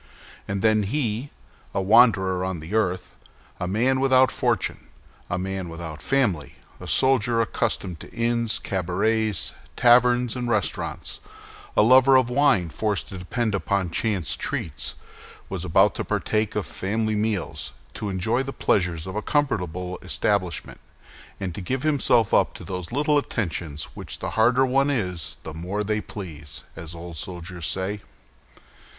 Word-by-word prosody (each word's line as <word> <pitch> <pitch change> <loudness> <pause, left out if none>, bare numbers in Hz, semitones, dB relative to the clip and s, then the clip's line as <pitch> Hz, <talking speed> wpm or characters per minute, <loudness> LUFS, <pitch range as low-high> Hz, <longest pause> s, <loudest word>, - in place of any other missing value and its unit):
And 100 0 -2
then 110 -1 +4
he—a 115 -1 -4
wanderer 95 -3 +5
on 95 -2 -2
the 80 +6 -8
earth, 95 -5 0 0.4
a 90 - -2
man 125 +7 +2
without 130 -1 +5
fortune, 120 -7 -1 0.4
a - - -1
man 95 -1 -3
without 80 -2 -7
family, 110 - +1 0.2
a - - -8
soldier 120 -3 +3
accustomed 90 -6 -1
to - - -10
inns, 115 -1 0
cabarets, 100 +2 0 0.2
taverns, 125 0 +4
and 125 -1 -2
restaurants, 105 -5 -2 0.6
a - - +7
lover 130 +3 +7
of 130 -2 +4
wine 125 - +3
forced 105 +4 -2
to 95 - -7
depend 110 +5 -1
upon 100 -2 0
chance 100 -5 -1
treats—was 75 -3 -6
about - - +4
to - - -3
partake 105 -1 -1
of 105 - -1
family 110 +3 -1
meals, 105 -3 -2 0.2
to 105 -2 -4
enjoy 105 +6 0
the 135 0 -4
pleasures 90 -10 0
of 95 +1 -6
a 105 - -1
comfortable 90 - -1
establishment, 95 -5 -1 0.6
and 95 -3 -3
to 100 - -6
give 130 +9 -2
himself 135 -7 +3
up - - +3
to - - -9
those 90 -2 -5
little 145 +3 +3
attentions 85 - -3
which - - -7
"the - - -4
harder 125 +4 +4
one 135 +2 +2
is, 90 - -2
the 80 - -7
more 90 +6 -3
they 105 +1 -1
please," 75 -10 -8
as 80 0 -8
old 85 -1 -8
soldiers 85 -1 -5
say. 95 +4 -2
105 Hz, 145 wpm, -24 LUFS, 90-120 Hz, 0.6 s, a